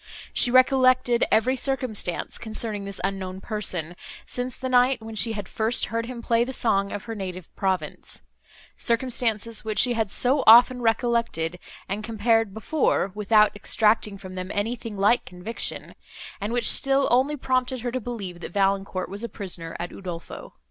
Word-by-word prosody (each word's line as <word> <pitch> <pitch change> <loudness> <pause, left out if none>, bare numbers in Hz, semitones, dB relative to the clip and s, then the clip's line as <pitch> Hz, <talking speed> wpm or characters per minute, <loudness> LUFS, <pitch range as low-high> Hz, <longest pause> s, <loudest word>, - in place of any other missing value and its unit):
She - - +3
recollected 255 -1 +4
every 250 +4 +3
circumstance, 255 -9 -2
concerning 215 -2 -4
this 200 -1 -5
unknown 190 -1 -3
person, 185 -6 -3 0.3
since 250 0 -4
the 260 - -4
night, 255 0 +3
when 220 0 -9
she 225 +1 +1
had 205 -3 -5
first 225 +2 0
heard 230 0 -1
him 240 -2 -7
play 230 0 +2
the 260 +2 -5
song 200 -5 +1
of 205 - -5
her 230 - -6
native 185 -4 -7
province;—circumstances, 225 - -3
which 215 -1 -4
she 245 +2 +5
had 225 -3 -1
so 255 +7 +1
often 245 +2 +8
recollected, 225 -7 0 0.3
and 200 +3 -4
compared 225 -1 +1
before, 220 -1 0
without 210 0 +3
extracting 210 0 +1
from 190 -1 -10
them 185 0 -5
anything 225 0 -3
like 205 +5 +3
conviction, 180 +6 -4 0.5
and 205 +2 -3
which 240 -2 +1
still 275 0 +4
only 265 +5 +2
prompted 255 -1 -1
her 245 0 -3
to 255 +1 -3
believe, 205 -7 -6
that 175 - -8
Valancourt 195 -1 0
was 200 +4 -6
a 235 - -4
prisoner 175 -5 -6
at 175 +1 -4
Udolpho. 175 -3 -8
220 Hz, 160 wpm, -25 LUFS, 195-245 Hz, 0.5 s, often